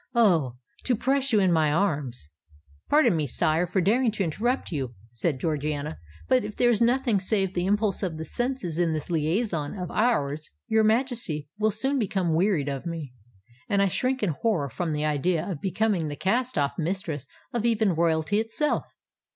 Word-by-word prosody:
Oh! 170 - +3 0.3
to 250 - +2
press 270 +4 0
you 215 - +4
in 190 -2 +3
my 155 -3 +3
arms——" 145 - -1 0.6
"Pardon 300 - +4
me, 155 -2 0
sire, 160 +6 +1
for 185 +2 +1
daring 230 +7 +3
to 205 - -1
interrupt 230 - -1
you," 130 -6 -3 0.2
said 130 +4 -1
Georgiana; 150 0 -2 0.3
"but 125 - +3
if 210 - -6
there 240 0 +4
be 235 - +2
nothing 240 -3 +2
save 190 -1 0
the 175 0 -1
impulse 205 -1 +1
of 175 -5 -2
the 160 - -5
senses 240 - -3
in 170 -2 +2
this 155 +2 -4
liaison 165 +1 -1
of 180 -2 -5
ours, 155 - 0 0.2
your 220 0 +3
Majesty 220 - +1
will 215 0 +3
soon 265 +7 -1
become 190 -6 0
wearied 170 -4 +2
of 140 +3 -3
me—and 125 - -6
I 200 -1 +3
shrink 255 +5 -1
in 195 - +2
horror 155 -2 0
from 170 +4 -3
the 150 0 -1
idea 155 +3 0
of 175 -8 -4
becoming 195 -3 0
the 145 - -4
cast 245 - 0
off 140 +3 0
mistress 165 -4 -3 0.3
of 235 -2 -1
even 220 -4 +2
Royalty 165 +4 +1
itself. 225 +7 -1
180 Hz, 180 wpm, -26 LUFS, 150-220 Hz, 0.6 s, you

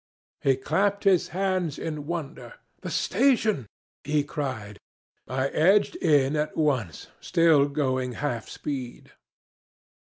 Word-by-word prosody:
He 135 -1 +3
clapped 195 +9 0
his 190 -4 +3
hands 185 -4 -1
in 150 -3 -5
wonder. 170 - -6 0.3
'The - - -5
station!' 220 - +1 0.4
he 150 0 +1
cried. 130 -9 -5 0.5
I 130 +1 -1
edged 195 - +3
in 145 - +3
at 150 0 -2
once, 130 - -1
still 160 -4 +4
going 130 -3 -1
half 120 -4 -3
speed. 130 -4 -6
150 Hz, 115 wpm, -26 LUFS, 130-170 Hz, 0.5 s, still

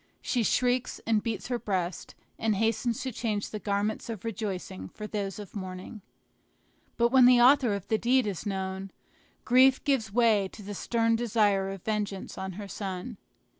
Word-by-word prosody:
She 245 - 0
shrieks, 245 +2 +1
and 220 -2 +2
beats 225 +1 -4
her 245 -1 -1
breast, 185 -5 -3 0.2
and 220 -2 +1
hastens 225 +2 0
to 260 - -3
change 215 -3 -2
the 215 - -4
garments 205 +2 -2
of 225 -2 -6
rejoicing 190 - -4
for 210 - -8
those 200 -3 -3
of 205 -1 -10
mourning. 185 +2 -7 1.0
But 235 0 +3
when 255 0 +6
the 250 -1 +7
author 250 -3 +5
of 200 -1 -7
the 220 - +1
deed 255 +1 +3
is 200 -5 -3
known, 190 -1 -3 0.6
grief 260 +1 +5
gives 265 -8 +1
way 220 -3 +3
to 210 - -10
the 205 +1 -6
stern 230 +2 +1
desire 210 -4 +2
of 195 -2 -7
vengeance 210 -3 -3
on 190 0 -5
her 200 +2 -7
son. 195 +3 -5
215 Hz, 170 wpm, -28 LUFS, 195-235 Hz, 1.0 s, the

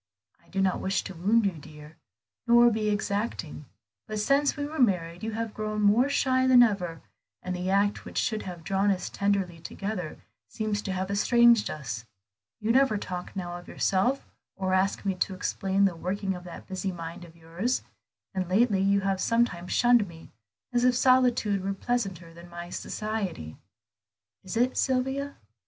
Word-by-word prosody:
I - - -27
do 195 - -1
not 190 -1 +1
wish 195 0 -1
to 190 - -7
wound 205 +6 +2
you, 195 - +2
dear, 150 +1 -13 0.5
nor 240 0 +7
be 215 -1 0
exacting; 205 -7 -2 0.4
but 215 - -4
since 275 +8 +2
we 290 - -2
were 305 +1 -6
married 180 -7 +1
you 220 0 -3
have 225 -1 -3
grown 215 0 -2
more 225 +7 +4
shy 260 -2 +2
than 250 -1 +8
ever, 180 -7 -1 0.4
and 185 0 -3
the 180 +1 -3
act 200 +1 +2
which - - -8
should 215 -1 0
have 175 -3 -8
drawn 195 +3 +1
us 190 -2 -1
tenderly 195 -4 0
together 190 -1 -5 0.3
seems 215 -2 -2
to 195 - -4
have 190 +1 -2
estranged 235 +2 +4
us. 120 -7 -5 0.6
You 220 0 0
never 265 -3 +4
talk 180 -2 -6
now 175 -2 -4
of 175 - -13
yourself, 240 +9 +1 0.3
or 190 -1 -1
ask 190 +2 +1
me 195 - +1
to 185 +1 -2
explain 195 +1 0
the 190 -3 +1
working 190 +3 -2
of 180 -1 -9
that 175 - -9
busy 190 0 -3
mind 170 0 -7
of 165 -1 -14
yours; 170 +9 -2 0.5
and 185 -2 -2
lately 200 0 +3
you 200 +1 +3
have 195 -1 0
sometimes 230 -7 0
shunned 240 -4 +4
me, 165 -1 -13 0.4
as 240 0 +2
if 250 0 +4
solitude 245 -6 +3
were 195 0 -2
pleasanter 195 -7 -3
than 170 +1 -13
my 175 0 -8
society. 200 - -4 0.9
Is 190 +3 -5
it, 250 +2 +2
Sylvia?" 265 +2 0
195 Hz, 175 wpm, -27 LUFS, 180-230 Hz, 0.9 s, than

